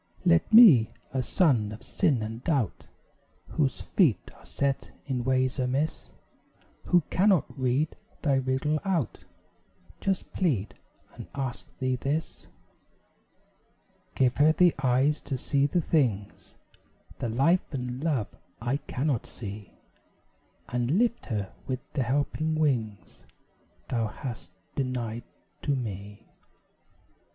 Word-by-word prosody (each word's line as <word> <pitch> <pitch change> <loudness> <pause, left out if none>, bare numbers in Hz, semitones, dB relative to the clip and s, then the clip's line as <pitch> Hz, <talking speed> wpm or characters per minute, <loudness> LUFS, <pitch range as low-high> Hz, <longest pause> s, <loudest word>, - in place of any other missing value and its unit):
Let 85 - +4
me, 190 - +8 0.2
a 130 - +1
son 125 - +2
of 110 - -9
sin 130 -8 +1
and 115 +3 -6
doubt, 135 - -1 0.6
Whose 135 -5 0
feet 150 - +1
are - - -19
set 140 -1 -1 0.2
in 130 -3 -2
ways 130 +1 +1
amiss 130 +5 -1 0.8
Who 175 -1 +4
cannot 190 -5 +4
read 135 +3 0 0.3
Thy 140 -4 +3
riddle 135 +4 0
out, 165 - -1 0.7
Just 195 -2 -2
plead, 125 - 0 0.4
and - - -9
ask 135 -3 -4
Thee 130 -1 0
this; 145 +5 -3 1.7
Give 125 -2 +3
her 150 +2 +6
the 175 +1 +4
eyes 135 +3 +2
to 135 - -3
see 140 +2 +1
the 175 +4 +1
things 120 - -1 0.6
The 120 - -2
Life 140 +11 +2
and 125 -1 -4
Love 140 -10 -1 0.2
I 120 +5 0
cannot 135 -3 -2
see; 100 -2 -9 0.9
And 125 +6 0
lift 235 +1 +1
her 105 -5 -3
with 130 -1 -2
the 145 - 0
helping 145 +5 0
wings 120 -9 -1 0.7
Thou 115 -3 0
hast 115 -3 -7 0.2
denied 120 -4 -3 0.4
to 145 - 0
me. 105 -4 -6
130 Hz, 120 wpm, -28 LUFS, 120-150 Hz, 1.7 s, me